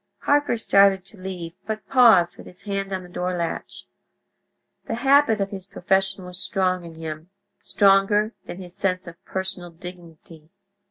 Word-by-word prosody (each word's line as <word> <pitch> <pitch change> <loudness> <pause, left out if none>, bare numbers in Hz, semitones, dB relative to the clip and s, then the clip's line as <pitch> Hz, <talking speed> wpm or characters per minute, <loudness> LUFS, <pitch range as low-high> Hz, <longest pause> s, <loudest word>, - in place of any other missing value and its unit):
Harker 290 -4 +2
started 195 -3 +4
to 195 -1 -14
leave, 180 -3 -6
but 215 -1 -4
paused, 230 -10 +5
with - - -13
his 180 +2 -16
hand 195 -1 -3
on 190 -1 -3
the - - -11
door 180 0 -3
latch. 170 -1 -5 1.0
The - - -2
habit 270 -2 +4
of 195 0 -2
his 190 -2 -7
profession 190 +1 0
was 180 0 -2
strong 185 -2 0
in 165 -1 -10
him—stronger 195 +6 0
than - - -7
his 180 -1 -8
sense 185 -1 -1
of 170 0 -12
personal 190 -2 -4
dignity. 165 -2 -12
190 Hz, 155 wpm, -23 LUFS, 175-200 Hz, 1.0 s, paused